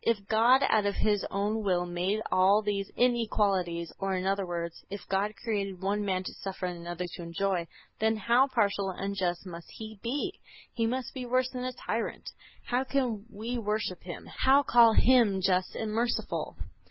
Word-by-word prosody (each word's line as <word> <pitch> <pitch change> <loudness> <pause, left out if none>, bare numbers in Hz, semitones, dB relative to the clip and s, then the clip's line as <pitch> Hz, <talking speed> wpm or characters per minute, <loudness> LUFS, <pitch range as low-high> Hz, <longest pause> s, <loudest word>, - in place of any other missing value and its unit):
If 230 -1 +3
God 240 +5 +5
out 210 -1 +3
of 200 - -1
His 205 -2 +1
own 205 +3 -1
will 180 -3 +1
made 180 +4 -1
all 195 +3 +4
these 200 -1 -2
inequalities, 200 -8 +1
or, 195 -1 -1
in 185 0 -2
other 195 -1 0
words, 170 -1 -4
if 200 0 -7
God 200 +2 0
created 200 -4 -3
one 200 +2 -1
man 190 -2 -1
to - - -6
suffer 190 -1 -5
and 175 -1 -4
another 175 +1 -4
to 175 - -8
enjoy, 170 +1 -1 0.3
then 220 0 +2
how 235 +6 +4
partial 200 -6 +1
and 185 - -7
unjust 190 -2 -2
must 170 -2 -9
He 220 -2 -9
be! 290 +11 -3 0.3
He 230 -1 0
must 255 +2 -3
be 255 -2 -5
worse 255 +1 +1
than 250 -1 -4
a 255 - -3
tyrant. - - -4 0.3
How 245 +2 0
can 250 -6 -1
we 235 +4 -4
worship 210 -4 -2
Him, 175 -2 -8
how 275 +2 +3
call 235 -3 +6
Him 235 -6 +4
just 185 -1 +1
and 220 -1 -3
merciful? 235 +2 -1
205 Hz, 185 wpm, -29 LUFS, 185-235 Hz, 0.3 s, call